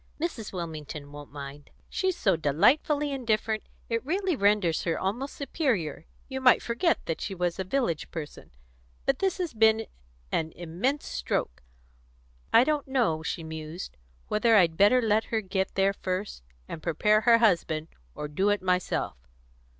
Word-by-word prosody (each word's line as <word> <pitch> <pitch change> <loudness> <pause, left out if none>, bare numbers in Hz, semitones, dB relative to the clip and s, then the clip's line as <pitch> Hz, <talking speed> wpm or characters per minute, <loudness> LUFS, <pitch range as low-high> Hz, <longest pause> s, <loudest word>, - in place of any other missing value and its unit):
Mrs. 300 - -3
Wilmington 155 -4 -6
won't 145 0 -10
mind. 140 0 -9 0.2
She's 375 -2 -1
so 190 -3 +3
delightfully 280 - +2
indifferent, 220 -4 0 0.3
it 230 -1 -1
really 365 +4 0
renders 200 - +2
her 165 - -1
almost 240 +9 -3
superior; 235 - -1 0.2
you 265 -1 -4
might 255 -1 +5
forget 240 +9 0
that 165 - -3
she 195 - -3
was 180 0 -1
a - - 0
village 185 - -1
person. 155 -3 -8 0.6
But 270 - +1
this 385 -1 +1
has 355 -6 -3
been 220 0 +4 0.5
an 160 0 -1
immense 185 - -2
stroke. 60 0 -2 0.9
I 235 - +7
don't 295 0 0
know," 235 -13 +1
she 165 +1 -4
mused, 160 +2 -7 0.3
"whether 225 +1 +3
I'd 170 -5 +5
better 210 +7 +5
let 220 0 +2
her 225 - -1
get 190 -2 -2
there 195 0 +3
first 185 - -4 0.3
and 160 - -7
prepare 210 +7 +2
her 230 0 +6
husband, 170 -8 +2 0.3
or 150 - -4
do 190 +8 +1
it 205 -2 +1
myself. 180 - 0
200 Hz, 155 wpm, -28 LUFS, 165-250 Hz, 0.9 s, I